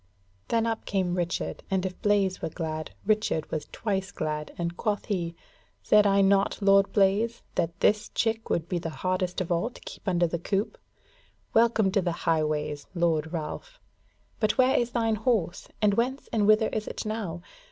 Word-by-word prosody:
Then 230 -1 +1
up 225 -1 -2
came 185 -3 0
Richard, 175 -1 -2
and 190 -1 0
if 185 -1 -5
Blaise 200 -2 +2
were - - -2
glad, 155 -1 -4 0.2
Richard 210 -7 0
was 155 - -3
twice 195 -4 -2
glad, 150 -1 -3
and 170 0 -2
quoth 205 +2 -1
he: 170 -5 -2 0.5
"Said 210 -1 +5
I 200 0 +4
not, 195 0 +3
Lord 195 -1 +4
Blaise, 205 +4 +2
that 170 -1 -1
this 210 +1 +3
chick 225 0 -1
would 165 0 0
be 180 -1 -1
the 165 - -4
hardest 185 +2 -2
of 180 - -3
all 170 +7 +1
to 250 - -15
keep - - -11
under 175 -2 +3
the 170 0 -2
coop? 195 +4 -2 0.7
Welcome 225 -3 +4
to 200 0 +2
the 175 -2 -1
Highways, 150 -2 0
Lord 160 -2 +1
Ralph! 180 - -6 0.6
But 215 -2 +1
where 260 +1 +4
is 240 -3 +2
thine 225 -2 0
horse? 215 -7 0 0.2
and 205 -1 +5
whence 255 +6 -1
and 210 -3 +2
whither 215 +1 +5
is 215 -1 -3
it - - -5
now? 200 -6 -4
195 Hz, 180 wpm, -27 LUFS, 170-215 Hz, 0.7 s, Said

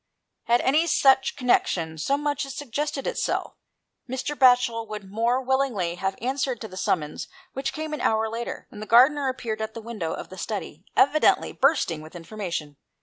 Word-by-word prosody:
Had 240 +1 +3
any 305 +5 +3
such 265 -4 +4
connexion 180 - +1
so 275 - +1
much 295 0 -1
as 275 -1 -7
suggested 290 +1 -3
itself, - - -1 0.6
Mr. 260 +3 -3
Batchel 245 -4 +4
would 210 -2 -8
more 235 +4 +1
willingly 260 -9 0
have 190 +2 -2
answered 260 0 -1
to 220 - -5
the 185 - -12
summons 160 -5 -1 0.3
which 270 +1 -2
came 310 0 -5
an 300 - -3
hour 220 0 +2
later, 230 +2 -5
when - - -11
the 215 - -7
gardener 270 +4 +5
appeared 230 -4 -4
at 220 0 -4
the - - -5
window 215 -8 -4
of - - -7
the 185 - -10
study, 190 -6 -5
evidently 300 +3 +4
bursting 265 - +1
with 155 +3 -12
information. 170 -5 -5
235 Hz, 175 wpm, -25 LUFS, 195-270 Hz, 0.6 s, gardener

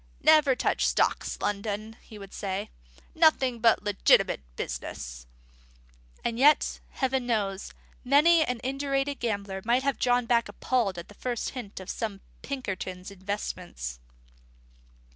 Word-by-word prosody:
"Never 305 -4 +6
touch - - +1
stocks, - - +1
Loudon," 205 +2 -2
he 220 - -13
would 195 -1 -11
say; 195 0 -4 0.4
"nothing 270 -7 +3
but 230 -1 +4
legitimate 205 - +3
business." - - -6 1.0
And 235 0 -1
yet, 295 +3 +4
Heaven 265 -2 -1
knows, 200 -4 -1 0.3
many 305 +5 +5
an 250 -4 -2
indurated 275 +1 -1
gambler 200 -4 -2
might 240 +3 +2
have 275 -1 0
drawn 245 -1 +2
back 235 0 +2
appalled 230 -8 0
at 170 - -7
the - - -14
first 240 +2 -3
hint 240 -8 -7
of 190 - -9
some 220 0 -3
of 195 - -15 0.2
Pinkerton's 190 -8 -5
investments! 180 - -5
225 Hz, 130 wpm, -28 LUFS, 195-265 Hz, 1.0 s, Never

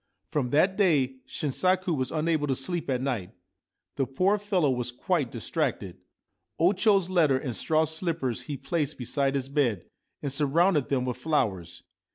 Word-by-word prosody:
From 135 -5 0
that 180 +8 +3
day 145 -10 +2
Shinsaku 185 +4 0
was 130 -3 -2
unable 155 -1 0
to 135 - +1
sleep 165 +4 -3
at 130 -1 0
night. 110 -10 -3 0.6
The 135 -2 0
poor 185 - +1
fellow 190 -8 +1
was 125 -1 -2
quite 145 +1 -1
distracted. 115 -7 -3 0.6
O 175 +5 +4
Cho's 195 -3 +2
letter 155 -7 +4
and 130 -3 -4
straw 155 +6 +2
slippers 160 - -2
he 140 +3 -6
placed 155 0 -2
beside 135 +2 -1
his 135 -1 -1
bed 135 - 0 0.4
and 140 - -1
surrounded 150 +2 +2
them 130 -2 0
with 125 -1 -3
flowers. 100 - -1
145 Hz, 160 wpm, -27 LUFS, 130-170 Hz, 0.6 s, O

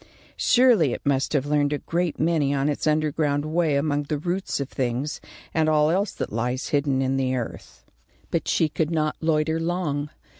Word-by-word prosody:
Surely 235 - +4
it - - -7
must 135 -1 +1
have 140 -2 +1
learned 145 0 +1
a 145 - 0
great 170 +2 -2
many 150 -3 +1
on 140 +1 +1
its 150 - -2
underground 150 -1 +1
way 160 -1 +1
among 145 0 +1
the 145 +1 -3
roots 180 +4 -2
of 140 - -2
things, 130 +3 -3 0.3
and 160 -1 +2
all 155 0 +3
else 195 +3 +1
that - - -5
lies 125 +3 -2
hidden 140 -2 +1
in 135 +1 0
the 130 -1 0
earth. 120 -3 -7 0.5
But - - -1
she 160 - +2
could 155 0 -1
not 155 -2 0
loiter 160 0 +1
long. 165 -4 -2
150 Hz, 185 wpm, -24 LUFS, 140-160 Hz, 0.5 s, Surely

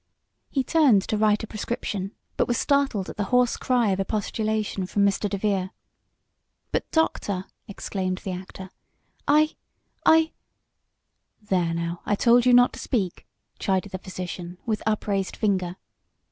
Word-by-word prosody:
He 270 - 0
turned 255 -9 +4
to - - +1
write 210 0 +2
a - - -4
prescription, 210 -2 -4 0.2
but - - +1
was 240 - +1
startled 275 -9 +1
at - - -8
the 205 - 0
hoarse 250 0 +3
cry 245 -4 +1
of 190 - 0
expostulation 215 -1 -1
from 200 +1 +2
Mr. 200 +1 +1
DeVere. 195 -2 0 1.0
"But, - - -1
doctor!" 200 - 0 0.2
exclaimed 190 -2 -3
the 190 - -3
actor, 190 +1 -8 0.6
"I 305 +2 +4 0.5
I 320 0 +5 0.6
" - - -51
"There, 170 -3 +2
now, 170 +1 -3
I 205 - +1
told 240 +3 +4
you - - +6
not 245 0 +6
to - - -8
speak!" 195 -8 -2 0.3
chided 190 0 0
the 185 - -4
physician, 180 -1 -6
with 220 -3 -1
upraised 200 -3 0
finger. 185 -5 0
205 Hz, 145 wpm, -25 LUFS, 190-235 Hz, 1.0 s, you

